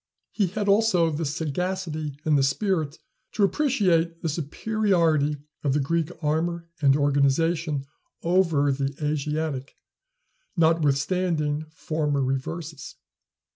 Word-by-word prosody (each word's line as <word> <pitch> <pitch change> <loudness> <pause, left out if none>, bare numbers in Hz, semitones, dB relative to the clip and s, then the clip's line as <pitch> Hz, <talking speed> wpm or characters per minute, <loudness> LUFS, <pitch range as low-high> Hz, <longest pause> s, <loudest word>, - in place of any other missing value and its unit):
He 200 -4 +1
had 205 +3 -3
also 200 -5 +3
the 155 +2 -2
sagacity 155 0 -3
and 155 -1 +3
the 140 - +4
spirit 155 +1 0 0.4
to 210 - +1
appreciate 185 - +2
the 165 - 0
superiority 165 -2 +1 0.3
of 140 -3 +1
the 150 - +2
Greek 160 +3 0
armor 165 +3 -1
and 140 -2 +5
organization 145 +1 +1 0.4
over 165 -5 +3
the 135 0 -2
Asiatic, 150 -2 -2 0.8
notwithstanding 155 0 +1
former 150 -3 -1
reverses. 145 +4 -4
155 Hz, 105 wpm, -25 LUFS, 145-175 Hz, 0.8 s, and